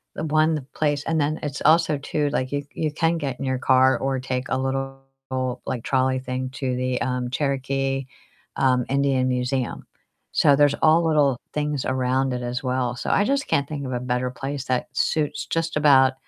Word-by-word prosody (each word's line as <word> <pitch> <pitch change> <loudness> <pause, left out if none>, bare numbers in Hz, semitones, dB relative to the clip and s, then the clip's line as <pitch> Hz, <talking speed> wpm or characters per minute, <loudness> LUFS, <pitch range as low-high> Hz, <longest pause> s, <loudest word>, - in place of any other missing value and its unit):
the - - -3
one 155 -2 +1
place 145 -1 0
and 160 -2 +1
then 155 +2 -1
it's 145 -2 -4
also 160 -1 +4
too, 145 +1 -1
like 130 +1 -1
you 145 0 -2
you 155 -2 -1
can 165 +2 +1
get 135 -5 -4
in 135 - -3
your 130 -1 0
car, 130 0 +4
or 135 -1 -1
take 130 0 -3
a - - +1
little, 135 0 -2 0.7
like, 120 -3 -3
trolley 130 0 +1
thing 130 0 -4
to 130 -2 -2
the, 125 0 -1
um, 125 0 -1
Cherokee, 135 -1 -1 0.5
um, 125 -2 +3
Indian 135 -2 +2
Museum. 125 0 -2 0.5
So 140 - +5
there's 145 0 +4
all 165 +2 +5
little 145 -5 +3
things 150 -2 -1
around 130 0 0
it 125 - -3
as 120 +1 -3
well, 125 -1 -1
so, - - -4
I 205 - +3
just 275 +3 0
can't 140 0 +1
think 145 -3 -4
of 130 - -4
a 120 - -1
better 125 0 -1
place 135 0 -5
that 125 -1 -1
suits 155 -2 0
just 165 -1 -1
about 135 -3 +5
135 Hz, 190 wpm, -23 LUFS, 130-145 Hz, 0.7 s, So